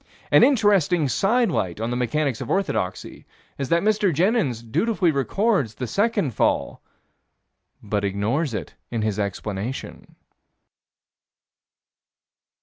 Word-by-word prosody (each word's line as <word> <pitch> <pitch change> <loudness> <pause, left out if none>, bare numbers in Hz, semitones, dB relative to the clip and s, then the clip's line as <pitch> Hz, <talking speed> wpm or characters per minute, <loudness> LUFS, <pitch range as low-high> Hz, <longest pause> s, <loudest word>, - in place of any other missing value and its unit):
An - - +7
interesting 200 - +3
sidelight 195 - +1
on 115 +2 -2
the - - -1
mechanics 125 +1 -1
of - - -6
orthodoxy 95 - -2 0.4
is 135 -2 -3
that 170 +2 +2
Mr. 210 -2 +2
Jenyns 165 - +1
dutifully 175 - +1
records 145 - 0
the 125 - -4
second 200 - 0
fall, - - 0 1.0
but 105 -1 -2
ignores 110 - -1
it - - -6 0.2
in 115 -2 -2
his 105 -1 -1
explanation. 105 +4 -5
140 Hz, 110 wpm, -23 LUFS, -, 1.0 s, An